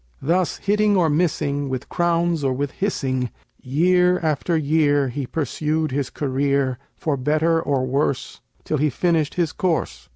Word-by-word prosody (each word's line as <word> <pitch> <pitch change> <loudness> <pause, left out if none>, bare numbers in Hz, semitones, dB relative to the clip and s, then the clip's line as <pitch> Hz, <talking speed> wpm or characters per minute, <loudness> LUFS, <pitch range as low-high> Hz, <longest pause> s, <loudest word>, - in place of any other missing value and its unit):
Thus 175 +4 +1
hitting 205 0 +2
or 165 -4 +3
missing, 145 -3 0
with 130 -2 -4
crowns 170 -2 0
or 135 -1 +1
with 140 +1 -2
hissing, 130 - -1 0.3
Year 180 +6 +3
after 160 +1 0
year 145 -2 +2
he 130 +1 -4
pursued 155 +1 -1
his 135 0 -1
career, 140 -2 0 0.2
For 155 -3 -1
better 155 +5 +1
or 135 -4 0
worse, 135 +1 -1 0.2
till 155 - -1
he 150 +1 +2
finished 160 +1 0
his 170 -3 0
course. 135 - -2
150 Hz, 150 wpm, -22 LUFS, 140-170 Hz, 0.3 s, or